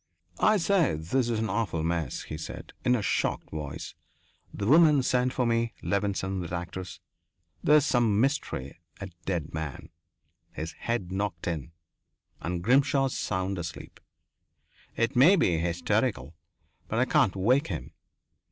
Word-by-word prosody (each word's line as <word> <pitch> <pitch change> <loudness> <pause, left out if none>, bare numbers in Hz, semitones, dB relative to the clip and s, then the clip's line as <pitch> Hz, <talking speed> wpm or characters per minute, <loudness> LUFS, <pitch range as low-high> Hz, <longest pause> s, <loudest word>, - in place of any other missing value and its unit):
"I 215 0 +4
say, 175 - +2
this 115 +11 0
is 115 - 0
an 110 -2 -1
awful 95 -7 -1
mess," 80 -5 -2
he - - -6
said, 80 - -8
in 125 -1 +3
a 110 - -1
shocked - - -1
voice. 75 -3 -6 0.6
"The 100 - -4
woman 150 +1 +6
sent 125 0 +2
for 125 - 0
me 115 0 +1
Levenson, 95 -1 -1
that 85 - -6
actress. 90 0 -5 0.6
There's 150 -1 +5
some 115 -7 +2
mystery. 110 - -1 0.2
A 95 -1 -6
man - - -24
dead 80 -4 -4 0.6
his 80 +1 -5
head 110 -4 -3
knocked 95 -3 -3
in. 80 -2 -3 0.7
And 85 +1 -3
Grimshaw 135 +3 +3
sound 95 -5 -2
asleep. 80 -2 -7 1.0
It 115 +1 0
may 150 +11 +7
be 85 - +2
hysterical, 85 0 0 0.5
but 110 - -2
I 125 - +3
can't 130 -9 +3
wake 125 +9 +2
him. 80 -10 -5
100 Hz, 145 wpm, -28 LUFS, 85-125 Hz, 1.0 s, may